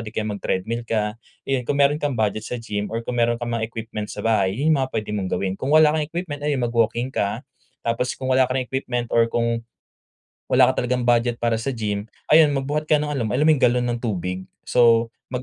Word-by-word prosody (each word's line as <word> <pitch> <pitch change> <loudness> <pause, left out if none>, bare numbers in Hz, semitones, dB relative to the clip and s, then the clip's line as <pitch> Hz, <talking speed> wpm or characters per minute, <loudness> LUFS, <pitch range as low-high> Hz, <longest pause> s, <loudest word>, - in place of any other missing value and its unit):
di 105 - -8
kaya 110 - -1
mag-treadmill 105 +3 -2
ka. 105 -1 -1 0.3
Ayun, 130 -2 0
kung 145 - +1
meron 140 +1 +4
kang 145 -2 0
budget 110 -1 0
sa 125 - -3
gym 105 -2 -3
or 115 - -1
kung 125 - -3
meron 120 0 +2
kang 120 0 -3
mga 110 - -1
equipment 110 -2 -6
sa - - -6
bahay, 100 -4 +2
yun 150 +5 +1
yung 150 - +3
mga 130 - -8
pwede 110 -2 -2
mong 95 -2 -2
gawin. 95 +1 0
Kung 130 - -3
wala 155 -1 +7
kang 155 - 0
equipment, 160 -2 -5
ayun, 145 -3 0
mag-walking 120 +1 0
ka, 105 +1 -2 0.4
tapos 115 +2 -1
kung 130 - -5
wala 130 0 +5
ka 125 - -3
ring 130 -1 -1
equipment 125 -3 -2
or 115 -1 +4
kung 115 0 0 0.8
wala - - +5
ka - - -3
talagang 125 0 0
budget 120 0 +2
para 115 -1 +1
sa 135 +3 -2
gym, 105 -2 -3 0.2
ayun 155 -1 +6
magbuhat 145 +3 -1
ka - - +5
nong 150 0 -2
alom 125 -6 -1
alam 145 - +2
mo 160 - +4
'yong 150 - +2
galon 125 0 +2
ng 120 - -3
tubig. 95 -5 -3 0.2
So, 115 -1 +4 0.2
mag 125 - -2
120 Hz, 235 wpm, -22 LUFS, 110-130 Hz, 0.8 s, wala